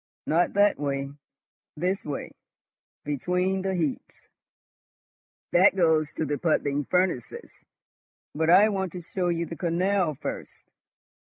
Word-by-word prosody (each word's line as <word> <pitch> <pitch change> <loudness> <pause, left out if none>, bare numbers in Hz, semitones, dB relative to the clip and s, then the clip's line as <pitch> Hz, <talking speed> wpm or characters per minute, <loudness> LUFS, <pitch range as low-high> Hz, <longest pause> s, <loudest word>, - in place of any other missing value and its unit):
Not 170 +3 +1
that 205 +1 +3
way! 140 -1 -2 0.7
This 185 +5 -1
way, 145 -2 -5 0.7
between 180 +7 -1
the 190 0 -1
heaps. 160 -6 -4 1.2
That 185 +2 +5
goes 160 -4 +2
to 160 - -2
the 145 0 -2
puddling 145 -3 0
furnaces, 180 -9 -1 0.8
but 160 +2 0
I 195 +5 +7
want 190 -3 -2
to 180 - -6
show 180 +2 -3
you 170 -1 0
the 165 - -7
canal 175 -1 0
first." - - -7
170 Hz, 120 wpm, -26 LUFS, 150-185 Hz, 1.2 s, I